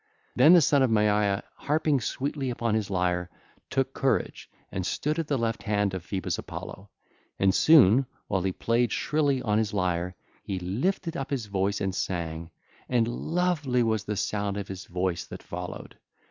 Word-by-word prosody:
Then 145 +7 +7
the 175 - +8
son 140 0 +4
of 130 - +4
Maia, 105 -2 +2
harping 150 -2 +1
sweetly 140 +1 -2
upon 115 -2 -1
his 110 -3 0
lyre, 90 -1 0 0.4
took 135 0 0
courage 135 -1 -1 0.2
and 95 - -3
stood 150 - -1
at 165 - -2
the 145 - +1
left 115 -1 -1
hand 105 -2 0
of 95 -2 -4
Phoebus 95 +2 -3
Apollo; 100 +1 -8 0.5
and 95 -1 +3
soon, 135 - +6 0.2
while 95 - 0
he 95 +1 0
played 115 +5 +1
shrilly 145 -4 +1
on 105 -1 +2
his 105 -2 -1
lyre, 90 -1 -1 0.3
he 95 - -4
lifted 145 - -1
up 135 - -4
his 130 -6 -2
voice 100 0 -1
and 95 -2 -1
sang, 85 -3 -3 0.4
and 120 -2 +2
lovely 155 -2 0
was 110 -2 0
the 105 -1 -3
sound 100 0 -1
of 100 -1 -5
his 95 -2 -7
voice 90 -1 -2
that - - -10
followed. 90 +1 -7
105 Hz, 175 wpm, -27 LUFS, 95-135 Hz, 0.5 s, the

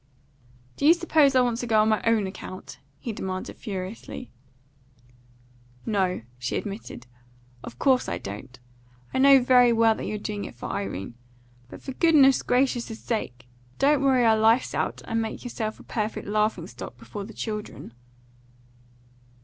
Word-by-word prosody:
"Do 285 - +2
you 330 - +8
suppose 310 -5 +3
I 255 - +6
want 240 -2 +1
to 245 - -3
go 220 -2 +3
on 220 - +2
my 215 - +2
own 225 -3 +3
account?" 190 -6 -8 0.2
he 230 - -5
demanded 185 -2 -5
furiously. 200 +4 -7 1.5
"No," 190 - 0 0.2
she 125 0 -3
admitted. 200 - -7 0.6
"Of 120 - -9
course 260 - +2
I - - -2
don't. 110 +6 -9 0.5
I - - 0
know 275 0 +8
very 250 -1 +6
well 225 -1 +4
that - - -6
you're 215 - -3
doing 205 0 -4
it - - -9
for 120 - -7
Irene; 100 0 -4 0.6
but, - - -11
for 270 - -5
goodness 285 -4 +5
gracious' 245 -3 0
sake, 125 - -4 0.3
don't 285 0 +3
worry 260 -3 +3
our 220 -1 +5
lives 225 +3 +3
out, - - -2
and 225 0 -1
make 220 -1 -5
yourself 225 -3 -4
a - - -13
perfect 215 -1 -3
laughing 215 +1 0
stock - - -9
before 205 -2 -7
the 215 - -9
children." 210 - -6
220 Hz, 155 wpm, -25 LUFS, 195-250 Hz, 1.5 s, you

